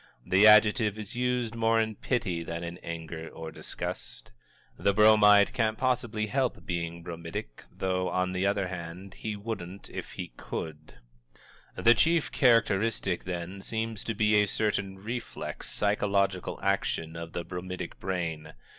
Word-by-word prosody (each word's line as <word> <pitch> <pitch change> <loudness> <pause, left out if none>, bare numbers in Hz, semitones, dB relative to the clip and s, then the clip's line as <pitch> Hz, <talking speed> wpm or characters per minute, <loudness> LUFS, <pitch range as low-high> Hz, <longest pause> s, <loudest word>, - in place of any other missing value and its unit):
The 95 +3 +6
adjective 105 0 +6
is 110 0 -7
used 125 -2 0
more 115 0 +2
in 110 -1 0
pity 100 -8 -1
than 85 0 -5
in 85 +1 -6
anger 80 -1 -6
or 80 -1 -8
disgust. - - -7 0.4
The 100 0 +1
Bromide 105 -1 +7
can't 110 -2 +1
possibly 120 -4 0
help 130 +3 -1
being 85 -1 -3
bromidic 85 -8 -7
though, 90 -1 -1
on 90 0 0
the 95 +1 0
other 100 -1 +1
hand, 90 +1 -7
he 110 +1 -4
wouldn't 100 -3 -6
if - - -6
he - - -6
could. 75 -1 -6 0.8
The 115 - +6
chief 165 +5 +2
characteristic, 115 -6 +2
then, 90 +1 -5
seems 110 0 -3
to 115 - -2
be 105 0 +4
a 105 - +1
certain 100 -2 -1
reflex 115 +5 -6
psychological 100 -2 0
action 85 -4 0
of 85 0 -7
the 85 - -3
bromidic 90 +1 -6
brain. 80 -5 -3
100 Hz, 145 wpm, -29 LUFS, 85-110 Hz, 0.8 s, Bromide